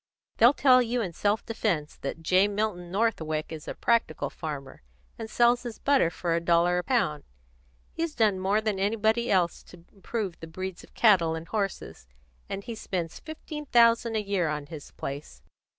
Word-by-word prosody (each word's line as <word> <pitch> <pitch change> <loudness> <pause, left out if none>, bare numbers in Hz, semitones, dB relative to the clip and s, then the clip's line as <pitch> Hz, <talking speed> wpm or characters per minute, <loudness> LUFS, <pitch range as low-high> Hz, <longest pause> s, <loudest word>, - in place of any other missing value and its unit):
They'll 240 +5 +6
tell 255 -2 +6
you 245 +1 -1
in 180 -4 -5
self 205 +5 0
defence 185 -9 -2
that 165 +4 -6
J. 185 +4 +4
Milton 205 -4 -2
Northwick 165 -8 -1
is 155 -2 -8
a - - -5
practical 230 -9 0
farmer, 140 -4 -7 0.4
and 225 -1 -6
sells 240 +1 +3
his 240 -3 -7
butter 275 -11 +3
for 170 0 -2
a 165 - +2
dollar 170 +1 +3
a - - -3
pound. 155 - 0 0.7
He's 330 -2 -3
done 210 -4 +2
more 195 +3 +1
than 215 -3 -1
anybody 220 +3 +1
else 180 -3 +1
to 175 -1 -16
improve 200 -2 -4
the 165 - -8
breeds 185 +2 -6
of - - -19
cattle 180 -8 +4
and 165 +1 -7
horses; 195 - -4 0.4
and 195 - -4
he 235 - -6
spends 180 -6 -4
fifteen 300 -1 -8
thousand 230 -1 +4
a 215 - 0
year 195 -4 0
on 150 -1 -3
his 150 -1 -10
place. 135 - -7
195 Hz, 180 wpm, -27 LUFS, 165-230 Hz, 0.7 s, They'll